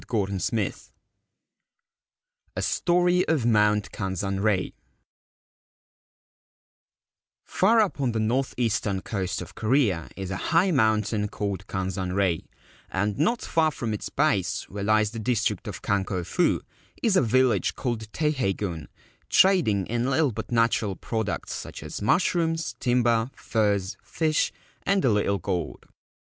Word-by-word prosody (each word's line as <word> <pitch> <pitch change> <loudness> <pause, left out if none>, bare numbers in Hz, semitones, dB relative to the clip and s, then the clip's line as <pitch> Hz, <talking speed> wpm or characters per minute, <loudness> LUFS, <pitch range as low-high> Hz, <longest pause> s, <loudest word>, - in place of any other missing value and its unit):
207 100 -4 -1 0.3
XXXIV - - -19 1.7
A - - -2
STORY 175 +1 +2
OF 150 -7 +1
MOUNT 105 -2 +3
KANZANREI 95 0 -1 2.7
FAR 225 +5 +3
up 195 -8 -1
on 130 -3 +1
the 110 - -2
north 125 +5 0
eastern 110 -5 0
coast 95 -2 -3
of - - -13
Korea 110 - +1
is 95 -1 -5
a 95 - -2
high 180 +3 +4
mountain 110 - +2
called 100 -2 -4
Kanzanrei, 95 -1 -1 0.4
and 100 +4 -1
not 230 +11 +1
far 160 -1 +2
from 120 -7 -4
its 105 - -4
base, - - 0
where 100 +1 -6
lies 110 0 +3
the 115 - -6
district 115 -2 -1
of 95 -3 -7
Kanko 95 -2 -1
Fu, - - +1 0.4
is 220 -4 +3
a - - +5
village 120 -4 +2
called 110 -4 -3
Teiheigun, 100 - -1 0.4
trading 155 - +4
in 120 +4 -1
little 140 0 +2
but 105 - -6
natural 115 -4 +2
products 110 -1 -3
such - - -7
as - - -6
mushrooms, 165 - +1
timber, 120 -2 +2
furs, 100 -4 0
fish, 155 -2 0 0.3
and 195 -5 +1
a 125 - +4
little 100 -1 +1
gold. 90 0 -4
110 Hz, 130 wpm, -26 LUFS, 100-135 Hz, 2.7 s, a